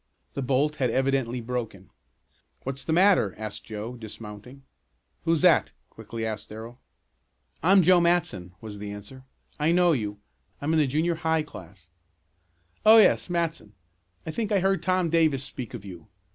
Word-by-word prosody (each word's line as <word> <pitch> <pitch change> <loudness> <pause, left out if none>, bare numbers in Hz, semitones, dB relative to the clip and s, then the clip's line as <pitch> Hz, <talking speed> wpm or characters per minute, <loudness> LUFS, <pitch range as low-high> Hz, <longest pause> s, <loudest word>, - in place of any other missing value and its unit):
The 140 - -3
bolt 140 +4 +1
had 130 -3 +1
evidently 130 -1 0
broken. 115 - -5 0.7
"What's 135 +1 -5
the - - -3
matter?" 180 - +4
asked 110 -1 -6
Joe, 110 +3 -6
dismounting. 110 +4 -10 0.6
"Who's 165 -2 +2
that?" 180 -3 +4 0.2
quickly 110 +1 -6
asked 110 -1 -5
Darrell. 115 +3 -9 0.8
"I'm 190 +3 +5
Joe 180 +1 +6
Matson," 105 - 0
was 105 -2 -8
the 105 0 -6
answer. 105 +6 -11 0.3
"I 150 +2 +2
know 175 0 +4
you. 105 -8 -2 0.4
I'm 150 +3 -1
in 160 - +3
the 150 - +3
junior 155 +6 +1
high 160 -1 +1
class." 90 - -13 1.0
"Oh, 220 +1 +9
yes. 215 - +5
Matson, 165 -11 -2 0.5
I 160 - -4
think 220 +3 -3
I 205 - +4
heard 195 -2 +1
Tom 185 -2 +1
Davis 155 -5 +2
speak 130 -3 -7
of 105 -4 -9
you. 85 -4 -10
135 Hz, 160 wpm, -26 LUFS, 110-165 Hz, 1.0 s, Oh